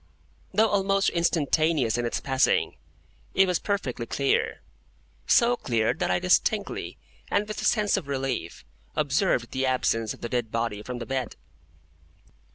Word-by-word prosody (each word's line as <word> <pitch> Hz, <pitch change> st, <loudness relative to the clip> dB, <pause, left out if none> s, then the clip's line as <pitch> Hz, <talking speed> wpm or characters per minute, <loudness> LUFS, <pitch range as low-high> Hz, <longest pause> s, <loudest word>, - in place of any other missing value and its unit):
Though 215 Hz, +3 st, +3 dB
almost 195 Hz, 0 st, +2 dB
instantaneous 160 Hz, -6 st, +1 dB
in 120 Hz, -1 st, -1 dB
its -, -, -2 dB
passing, 135 Hz, 0 st, +1 dB, 0.6 s
it 195 Hz, -, +6 dB
was 180 Hz, -2 st, 0 dB
perfectly 130 Hz, -, -3 dB
clear; 140 Hz, +3 st, 0 dB, 0.7 s
so 245 Hz, -2 st, +4 dB
clear 115 Hz, -, 0 dB
that -, -, -2 dB
I -, -, +2 dB
distinctly, 185 Hz, +3 st, 0 dB, 0.3 s
and 210 Hz, -, +1 dB
with 215 Hz, 0 st, -5 dB
a -, -, -3 dB
sense 210 Hz, -2 st, +2 dB
of 140 Hz, -, -5 dB
relief, 135 Hz, -10 st, -3 dB, 0.3 s
observed 145 Hz, -4 st, +1 dB
the 130 Hz, 0 st, 0 dB
absence 115 Hz, -3 st, 0 dB
of -, -, -9 dB
the 120 Hz, -, -4 dB
dead 120 Hz, -2 st, -1 dB
body 115 Hz, -3 st, -2 dB
from 125 Hz, +3 st, -6 dB
the 120 Hz, -, -6 dB
bed. 130 Hz, -2 st, -3 dB
140 Hz, 150 wpm, -26 LUFS, 120-195 Hz, 0.7 s, it